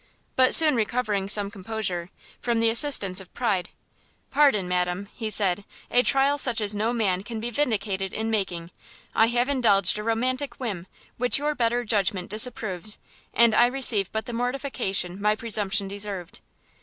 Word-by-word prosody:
But 255 0 +5
soon 310 -4 +6
recovering 215 -3 -1
some 205 -1 +2
composure, 190 -3 -4 0.3
from 235 -1 -1
the 225 0 +2
assistance 215 -7 +2
of 185 - -15
pride, 200 -7 -1 0.6
"Pardon, 275 -10 +3
madam," 180 +2 -2
he 220 -2 -5
said, 200 -2 +2 0.3
"a 245 - +5
trial 275 +2 +2
such 250 -5 +2
as 210 -1 +1
no 215 +3 -1
man 200 -6 0
can 225 +2 -7
be 235 +2 -4
vindicated 205 -7 -1
in 220 +1 -3
making. 180 -5 -2 0.4
I 225 - +4
have 240 +1 0
indulged 210 -8 +2
a - - -5
romantic 250 +4 -2
whim, 200 -8 -5 0.3
which 250 0 +2
your 295 +2 -1
better 240 -2 0
judgment 195 -4 0
disapproves, 215 -3 0 0.3
and 235 -1 +4
I 240 - +5
receive 240 -7 +1
but 220 0 -3
the 240 - -7
mortification 240 -7 -2
my 210 +1 +2
presumption 210 -3 0
deserved." 200 -3 -5
220 Hz, 160 wpm, -24 LUFS, 195-245 Hz, 0.6 s, soon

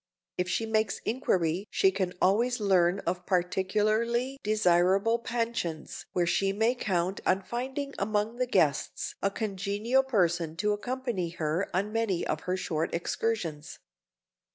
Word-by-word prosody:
If 180 0 -1
she 225 - 0
makes 220 -2 +1
inquiry 190 -6 0
she 190 - +3
can 185 -2 -2
always 235 +6 +2
learn 190 -2 +3
of 180 +1 -3
particularly 215 +8 +1
desirable 200 +2 +3
pensions 230 -10 -3
where 175 - +2
she 195 +3 +1
may 220 +4 +2
count 190 -5 -1
on 190 +1 +2
finding 265 +5 -4
among 210 +3 0
the 250 0 0
guests 155 - +1
a 200 - +2
congenial 205 +4 0
person 175 -10 +1
to 210 +3 +1
accompany 240 -5 -2
her 165 +3 -2
on 200 +4 -1
many 225 -6 0
of 155 - -1
her 185 - +1
short 160 -3 -2
excursions. 170 -4 -2
200 Hz, 135 wpm, -29 LUFS, 180-225 Hz, -, she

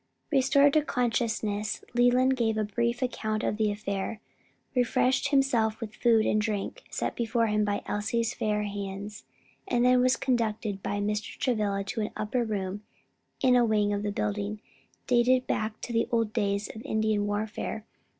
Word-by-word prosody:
Restored 280 +1 +4
to 310 - +5
consciousness, 220 -5 -1
Leland 250 +2 +4
gave 225 -3 0
a 215 - +1
brief 235 +4 -1
account 215 -3 -2
of 210 - 0
the 215 -1 +2
affair, 205 0 -3 0.6
refreshed 250 +2 +2
himself 250 -6 +2
with 215 -2 -6
food 225 -2 +3
and 215 - +2
drink 210 -2 -3
set - - -3
before 230 0 +1
him 210 -1 +1
by 205 -1 -1
Elsie's 225 +2 -1
fair 210 -1 -1
hands, 200 0 -6 0.4
and 245 0 +2
then 250 0 +5
was 255 0 +4
conducted 220 -5 -1
by 205 - -2
Mr. 210 +1 -2
Travilla 210 -5 0
to 200 +3 -3
an 210 - -1
upper 230 +4 -1
room 205 -2 -3 0.6
in 255 -1 +5
a 245 - +5
wing 210 -2 +2
of 205 - -1
the 205 0 -2
building, 205 +1 -2 0.5
dating 250 +1 +4
back 215 -3 -2
to 240 - -5
the 230 - +2
old 225 -2 +1
days 200 -2 0
of 220 - -7
Indian 215 -1 0
warfare. 215 +1 -3
220 Hz, 165 wpm, -28 LUFS, 210-240 Hz, 0.6 s, to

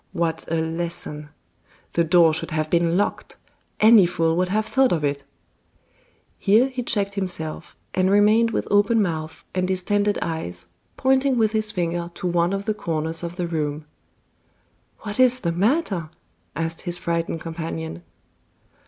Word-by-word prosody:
What 165 -3 -2
a - - +1
lesson! 160 -2 -3 0.6
The 170 - +3
door 165 -1 +5
should 160 - -1
have 155 -1 -2
been 170 0 +2
locked; 205 - -2 0.4
any 215 -4 +7
fool 165 -2 0
would 180 +1 0
have 215 +3 0
thought 265 +3 +2
of 160 -3 0
it 140 -1 -1 0.6
" - - -37 0.3
Here 220 +6 +4
he 255 -1 -4
checked 200 -4 0
himself, 175 -5 -4 0.2
and 185 0 +2
remained 210 +3 +4
with - - -2
open 205 +3 +4
mouth 160 -5 -2
and 185 0 0
distended 205 +2 0
eyes, 90 - -4 0.3
pointing 265 0 +2
with 220 -2 +2
his 215 -1 +1
finger 170 -2 -2
to 190 - -7
one 175 0 +1
of 195 0 -3
the 215 - 0
corners 160 -4 -3
of 170 0 -5
the 180 -1 -2
room. 155 -2 -3 1.2
"What 210 +1 -6
is 255 0 +5
the 170 - 0
matter?" 195 - 0 0.5
asked 165 0 -3
his 175 -1 -3
frightened 165 -1 -2
companion. 85 - -5
175 Hz, 155 wpm, -23 LUFS, 165-210 Hz, 1.2 s, any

